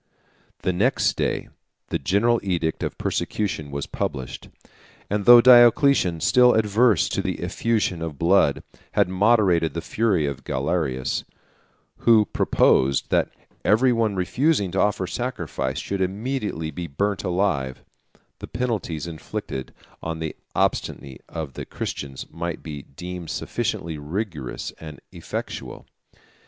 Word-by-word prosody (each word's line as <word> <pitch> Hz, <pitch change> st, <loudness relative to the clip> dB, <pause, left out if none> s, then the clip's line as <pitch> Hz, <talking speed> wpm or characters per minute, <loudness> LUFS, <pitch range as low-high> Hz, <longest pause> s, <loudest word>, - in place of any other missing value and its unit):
] -, -, -37 dB
The 90 Hz, -, +1 dB
next 110 Hz, +10 st, +2 dB
day -, -, -2 dB, 0.4 s
the -, -, -1 dB
general 110 Hz, -, +2 dB
edict 85 Hz, -4 st, -1 dB
of -, -, -3 dB
persecution 95 Hz, -8 st, -2 dB
was 70 Hz, 0 st, -4 dB
published; 65 Hz, -3 st, -4 dB, 0.6 s
152 -, -, -3 dB
and 105 Hz, -1 st, -1 dB
though 120 Hz, +1 st, +10 dB
Diocletian, 120 Hz, -, +6 dB
still 125 Hz, +6 st, +5 dB
averse 110 Hz, -1 st, +3 dB
to -, -, -1 dB
the -, -, -3 dB
effusion 110 Hz, -7 st, 0 dB
of 80 Hz, -3 st, -5 dB
blood, 85 Hz, -3 st, +3 dB, 0.3 s
had -, -, +3 dB
moderated 95 Hz, -5 st, +3 dB
the -, -, -1 dB
fury 95 Hz, -2 st, +1 dB
of 70 Hz, -2 st, -4 dB
Galerius, 65 Hz, -2 st, -1 dB, 0.7 s
who 110 Hz, -2 st, +5 dB
proposed, 70 Hz, -7 st, +2 dB
that -, -, +2 dB, 0.3 s
every 125 Hz, +4 st, +4 dB
one 110 Hz, -3 st, +1 dB
refusing 100 Hz, -, +1 dB
to 95 Hz, -, -1 dB
offer 105 Hz, -2 st, +1 dB
sacrifice 85 Hz, -, -3 dB
should 100 Hz, -1 st, -3 dB
immediately 100 Hz, -4 st, -2 dB
be 85 Hz, +3 st, -5 dB
burnt 100 Hz, +7 st, -1 dB
alive, 90 Hz, -9 st, -1 dB, 0.6 s
the -, -, -7 dB
penalties 110 Hz, -10 st, -2 dB
inflicted 80 Hz, -5 st, -6 dB, 0.3 s
on 80 Hz, 0 st, -4 dB
the 80 Hz, -1 st, -4 dB, 0.2 s
obstinacy 65 Hz, -2 st, -1 dB
of 80 Hz, -5 st, -5 dB
the -, -, -6 dB
Christians 70 Hz, -2 st, -5 dB
might 85 Hz, 0 st, -5 dB
be 75 Hz, -3 st, -6 dB
deemed 90 Hz, +4 st, -8 dB
sufficiently 80 Hz, -2 st, -3 dB
rigorous 75 Hz, -, -4 dB
and 75 Hz, -3 st, -9 dB
effectual. -, -, -6 dB
90 Hz, 130 wpm, -23 LUFS, 80-110 Hz, 0.7 s, though